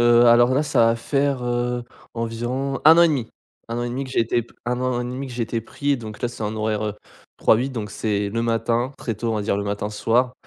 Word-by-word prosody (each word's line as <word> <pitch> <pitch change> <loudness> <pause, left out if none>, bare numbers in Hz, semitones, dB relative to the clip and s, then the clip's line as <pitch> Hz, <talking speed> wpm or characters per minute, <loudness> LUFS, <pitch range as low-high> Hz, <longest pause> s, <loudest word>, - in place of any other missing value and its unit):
Heu, 120 0 +6
alors 120 +2 +6
là 145 - +3
ça 140 -6 +3
va 115 0 +3
faire, 140 +1 0
heu, 120 0 -1 0.3
environ 120 +4 -2
1 160 +2 +9
an - - +8
et 170 - +6
demi! 130 -7 -1 0.4
1 115 - -2
an - - -1
et 120 - -2
demi 130 +3 -3
que 130 - -9
j'ai - - +1
été 115 +1 +1
p 120 - -21
1 125 +1 -1
an 130 -1 0
et - - -3
demi 130 +3 -4
que 130 - -9
j'ai 120 -1 -2
été 115 +1 -2
pris, 140 +5 -1
donc 110 -3 -9
là 120 - +1
c'est 120 - -8
en 105 +1 -2
horaires, 110 0 -1
heu, 105 -1 -2 0.4
3-8, 120 +4 +3
donc 110 -5 -5
c'est 105 -1 -1
le 115 +3 -1
matin 115 +3 0
très 115 - -3
tôt, 115 +3 -2
on - - -1
va 105 - -1
dire 100 -1 0
le 100 - -2
matin-soir. 105 +5 0
120 Hz, 265 wpm, -22 LUFS, 110-125 Hz, 0.4 s, 1